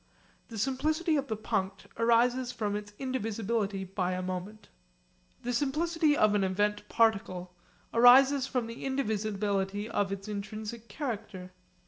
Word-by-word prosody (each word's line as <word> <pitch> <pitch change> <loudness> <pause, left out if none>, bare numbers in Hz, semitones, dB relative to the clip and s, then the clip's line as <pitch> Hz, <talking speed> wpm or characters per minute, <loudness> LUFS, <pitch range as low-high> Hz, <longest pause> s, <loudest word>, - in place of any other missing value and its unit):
The 225 - -8
simplicity 310 - 0
of 280 -1 -1
the 220 - -3
punct 195 -2 -2
arises 240 +2 +2
from 210 -4 -2
its 205 0 -5
indivisibility 225 -5 -2
by 185 -1 -2
a 185 0 -3
moment. 185 +4 -5 0.8
The 245 +1 -2
simplicity 300 +4 +1
of 215 -1 +4
an 205 -1 +2
event 205 +2 0
particle 195 -5 +1 0.4
arises 260 +3 +7
from 250 -4 -1
the 230 +1 -8
indivisibility 210 -5 -1
of 205 -3 -1
its 195 +1 -5
intrinsic 215 +2 -6
character. 210 -7 -5
220 Hz, 130 wpm, -30 LUFS, 200-250 Hz, 0.8 s, arises